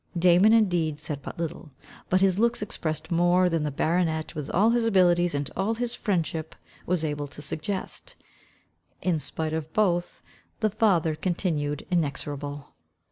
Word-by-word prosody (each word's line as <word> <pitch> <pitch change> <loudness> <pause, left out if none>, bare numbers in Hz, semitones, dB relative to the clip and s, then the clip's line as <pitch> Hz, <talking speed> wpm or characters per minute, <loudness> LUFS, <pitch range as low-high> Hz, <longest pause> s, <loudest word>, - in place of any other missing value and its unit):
Damon 180 +4 +5
indeed 175 -9 +2
said 150 -2 -5
but - - -8
little, 165 -1 -5 0.4
but 185 +1 +3
his 195 0 +3
looks 235 -1 +2
expressed 160 -4 -4
more, 175 +2 +4
than 165 -2 0
the 150 - -1
baronet, 160 +2 0
with 150 -3 -5
all 210 +6 +3
his 240 0 +2
abilities, 175 -6 +3
and 145 -1 -2
all 205 +5 0
his 240 +1 -2
friendship, 165 -7 -2 0.3
was 175 -2 +1
able 145 -1 -3
to 140 - -12
suggest. 190 - -3 0.9
In 175 -4 +1
spite 155 +1 -3
of 160 -1 -3
both, 175 -5 +1 0.4
the 215 -1 +1
father 180 -7 +2
continued 155 -4 -2
inexorable. 145 -3 -3
170 Hz, 150 wpm, -26 LUFS, 155-190 Hz, 0.9 s, Damon